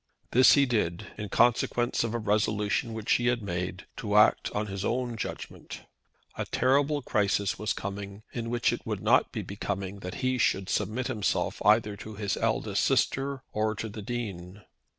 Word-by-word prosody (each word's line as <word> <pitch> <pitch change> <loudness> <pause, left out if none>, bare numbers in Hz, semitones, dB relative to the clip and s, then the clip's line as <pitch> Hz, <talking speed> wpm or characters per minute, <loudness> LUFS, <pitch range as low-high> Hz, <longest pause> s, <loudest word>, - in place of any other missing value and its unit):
This 130 +2 +7
he 140 -1 +5
did, 105 -9 -1
in 105 -2 -6
consequence 120 +1 +2
of 115 0 -2
a - - +2
resolution 105 +1 0
which 110 -1 -3
he 120 - +3
had 120 -2 +1
made, 90 0 -4
to 105 -1 -2
act 105 - +5
on 105 +1 -2
his 100 -1 -5
own 120 +1 -1
judgment. - - -7 0.5
A - - -3
terrible 145 +2 +2
crisis 100 -3 0
was 105 - -1
coming, 100 +1 -5
in 115 -1 -3
which 120 -1 +1
it - - -5
would - - -4
not - - +4
be - - -4
becoming 100 -1 -4
that 90 -1 -6
he 130 0 +1
should 95 -3 +1
submit 110 +6 -1
himself 105 -4 -1
either 105 -1 +4
to 110 +1 -9
his 100 -1 -1
eldest - - 0
sister, 135 0 +1
or 110 0 0
to 110 +2 -4
the 105 +1 -7
Dean. 100 -4 -5
105 Hz, 175 wpm, -28 LUFS, 100-120 Hz, 0.5 s, This